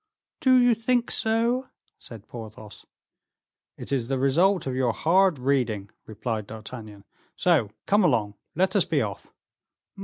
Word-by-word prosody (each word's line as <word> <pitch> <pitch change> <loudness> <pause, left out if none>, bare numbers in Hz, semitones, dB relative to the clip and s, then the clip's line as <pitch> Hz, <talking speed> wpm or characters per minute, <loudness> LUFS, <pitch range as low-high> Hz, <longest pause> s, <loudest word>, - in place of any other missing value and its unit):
"Do 260 -2 +5
you 245 -1 +5
think 235 +2 0
so?" 235 +4 +1 0.3
said 110 -3 -12
Porthos. 110 -2 -11 0.9
"It - - -9
is 130 -4 0
the 135 0 -1
result 170 +9 +2
of 130 - -2
your 125 -3 +1
hard 185 +3 +3
reading," 125 -6 -1 0.2
replied 110 -1 -4
D'Artagnan. 110 -2 -10 0.3
"So 160 - +2 0.2
come 205 +1 +3
along, 115 - +1 0.2
let 190 +3 +1
us - - +4
be - - +1
off." - - -7
135 Hz, 140 wpm, -25 LUFS, -, 0.9 s, Do